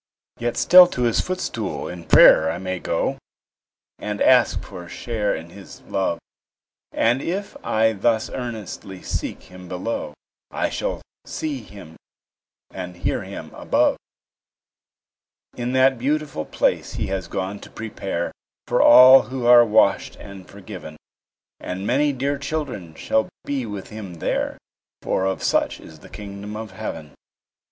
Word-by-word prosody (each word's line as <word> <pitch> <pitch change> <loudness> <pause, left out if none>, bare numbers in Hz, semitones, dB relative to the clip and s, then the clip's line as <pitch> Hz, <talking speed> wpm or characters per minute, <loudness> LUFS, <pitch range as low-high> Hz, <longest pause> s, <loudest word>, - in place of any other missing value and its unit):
Yet 120 0 -2
still 180 0 +8
to 125 -7 -3
His 115 -2 +2
footstool 120 - -4
in 85 -1 -8
prayer 80 - +7
I 80 - -2
may 95 0 -4
go, - - -1 0.8
And 105 -1 -4
ask 125 -2 +4
for 90 -3 -9
a - - -13
share 110 -1 -2
in 80 +1 -9
His 100 0 -13
love; 95 -3 -1 0.7
And 120 +4 +2
if 195 +6 -4
I 110 0 +2
thus 110 +2 +1
earnestly 110 -6 -7
seek - - -4
Him 90 0 -13
below, 90 -4 -4 0.3
I - - -2
shall - - -3 0.2
see 145 -5 -4
Him 100 -7 -13 0.7
and 90 -1 -7
hear - - -1
Him - - -9
above; - - +1 1.6
In 120 +1 -3
that 130 -1 +4
beautiful 145 - -1
place - - 0
He - - -2
has 95 -3 -3
gone 95 +3 -4
to - - -12
prepare 100 -5 -4 0.3
For - - +2
all 130 +2 +9
who 130 -2 -4
are 120 0 +8
washed 110 -2 +2
and 100 -2 -11
forgiven; 95 -6 -10 0.6
And 95 +2 -5
many 145 +6 +2
dear 140 +1 -2
children 140 - -4
shall 110 - 0 0.2
be 135 -4 -2
with 100 -2 -7
Him 105 -5 -8
there, 80 - -2 0.5
For 95 - 0
of 95 - -3
such - - +1
is 80 -1 -14
the - - -15
kingdom 100 0 -8
of 110 -2 -7
heaven. 75 -5 -7
105 Hz, 145 wpm, -22 LUFS, 95-125 Hz, 1.6 s, all